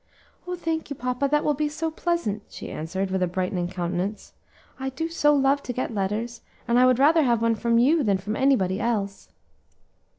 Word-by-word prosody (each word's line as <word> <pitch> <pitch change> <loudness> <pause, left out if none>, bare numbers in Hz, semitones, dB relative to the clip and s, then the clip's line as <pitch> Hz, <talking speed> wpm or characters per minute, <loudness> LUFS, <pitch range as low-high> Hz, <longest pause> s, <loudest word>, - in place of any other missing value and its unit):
"Oh! 360 - -2
thank 325 -3 -3
you, 285 - -4
papa; 250 +2 -1
that 295 +1 +2
will 300 - +3
be 300 +1 -1
so 320 +2 -3
pleasant," 315 -11 -1
she - - -8
answered, 190 +5 -3
with 190 0 0
a 180 - +2
brightening 180 0 -2
countenance. 180 +3 -3 0.5
"I 265 0 -2
do 320 +5 -4
so 295 -3 +3
love 275 +1 +3
to 245 - -5
get 250 -1 -3
letters, 215 +4 -2 0.3
and 235 +1 +3
I 255 - +6
would 255 -1 +4
rather 310 +5 +5
have 240 -5 +2
one 230 0 +3
from 230 +1 +1
you 295 +7 +4
than 205 -7 +2
from 205 +3 -4
anybody 215 -9 +2
else." 205 -4 -2
240 Hz, 200 wpm, -25 LUFS, 195-290 Hz, 0.5 s, I